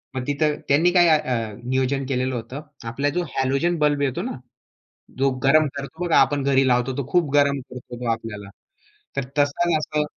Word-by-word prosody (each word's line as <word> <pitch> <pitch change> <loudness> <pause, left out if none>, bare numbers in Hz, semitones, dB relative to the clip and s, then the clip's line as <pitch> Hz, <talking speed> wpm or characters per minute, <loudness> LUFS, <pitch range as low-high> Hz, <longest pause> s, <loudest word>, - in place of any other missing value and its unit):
मग 130 - -1
तिथं 150 +1 +1
त्यांनी 160 +6 +4
काय 175 -1 +5
अ, 120 -8 +1
नियोजन 130 +2 0
केलेलं 130 0 -1
होतं. 120 +5 -6 0.3
आपला 140 +5 -1
जो 175 - +1
हॅलोजन 140 +6 +1
बल्ब 145 -1 +2
येतो 135 -3 -1
ना, - - -4 0.8
जो 135 0 +3
गरम 155 +3 +5
करतो 160 +5 -5
बघा 170 - +2
आपण 140 +1 +3
घरी 135 -1 +3
लावतो, 125 +1 +1
तो 140 -3 -3
खूप 175 -5 +2
गरम 140 -1 +3
करतो 125 -1 -9
आपल्याला. 105 -3 -6 0.7
तर 140 - 0 0.2
तसंच 150 +4 +2
असं 150 0 -1
140 Hz, 170 wpm, -23 LUFS, 125-150 Hz, 0.8 s, काय